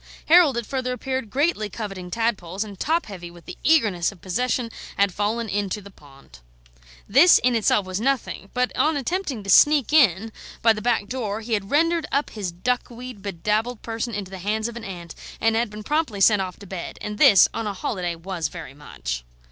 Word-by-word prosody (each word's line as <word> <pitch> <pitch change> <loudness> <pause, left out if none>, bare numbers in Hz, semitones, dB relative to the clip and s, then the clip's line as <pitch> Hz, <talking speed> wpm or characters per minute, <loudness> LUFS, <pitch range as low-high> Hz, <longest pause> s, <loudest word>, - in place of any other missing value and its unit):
Harold, 320 -6 +6
it 235 - -2
further 255 +1 -2
appeared, 260 -2 -3
greatly 270 -5 0
coveting 195 -5 -6
tadpoles, 200 -3 -1
and 205 -3 -11
top 330 +3 +1
heavy 180 -4 -8
with 170 0 -16
the - - -8
eagerness 215 - +3
of 200 - -16
possession, 230 +6 -1 0.3
had 200 -2 +2
fallen 220 +4 -1
into 205 0 -2
the 200 0 -13
pond. 135 - -18 0.7
This, 285 - +7
in 250 0 +2
itself, 210 -2 +2
was 185 +2 -4
nothing; 260 -6 -1
but 250 0 0
on 310 -1 +2
attempting 285 - -2
to 195 - -7
sneak 295 +3 +5
in 225 - +4 0.3
by 225 -1 +6
the 215 - -6
back 240 -2 +1
door, 220 -4 -3
he 225 +1 -4
had 200 -2 -1
rendered 330 +1 +2
up 280 +2 0
his 200 -5 -4
duckweed 245 +3 -4
bedabbled 210 +5 -2
person 230 0 -3
into 195 -2 -5
the 190 - -7
hands 215 +4 -1
of 235 - -8
an 235 - -7
aunt, 175 -5 -8 0.3
and 225 0 +2
had 230 0 +1
been 210 +1 -9
promptly 295 -6 -1
sent 205 0 +5
off 185 -1 -5
to 205 - -12
bed; 185 -2 -7
and 210 0 -6
this, 245 -10 +7
on 225 -1 -3
a 205 - -2
holiday, 180 -3 -3
was 170 -1 -3
very 135 -2 -9
much. 65 - -6
215 Hz, 200 wpm, -23 LUFS, 190-250 Hz, 0.7 s, This